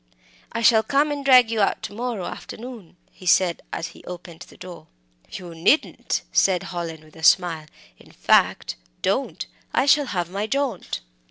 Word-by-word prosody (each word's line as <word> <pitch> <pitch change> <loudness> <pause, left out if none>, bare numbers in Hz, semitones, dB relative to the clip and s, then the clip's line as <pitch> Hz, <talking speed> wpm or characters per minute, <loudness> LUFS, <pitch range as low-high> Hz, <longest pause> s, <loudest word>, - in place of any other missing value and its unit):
"I 230 - -3
shall 225 -1 +6
come 280 +7 +1
and 285 -1 -3
drag 255 -4 +6
you 220 -2 0
out 200 - +1
to 205 - -6
morrow 230 -4 -3
afternoon," 225 -7 -9
he 185 - -12
said, 175 -1 +3
as 165 - -4
he - - -16
opened 175 -2 -9
the - - -17
door. 180 -1 -11 0.4
"You 175 -3 -8
needn't," 170 - +1
said 185 -3 +3
Hallin, 165 -3 -6
with 155 -1 -20
a 160 - -12
smile; 165 -2 +3 0.3
"in - - -18
fact, - - +2 0.3
don't; - - -1 0.3
I - - +3
shall 285 0 +4
have 175 -5 -3
my 200 +3 -2
jaunt." 275 +2 -2
195 Hz, 170 wpm, -23 LUFS, 175-245 Hz, 0.4 s, shall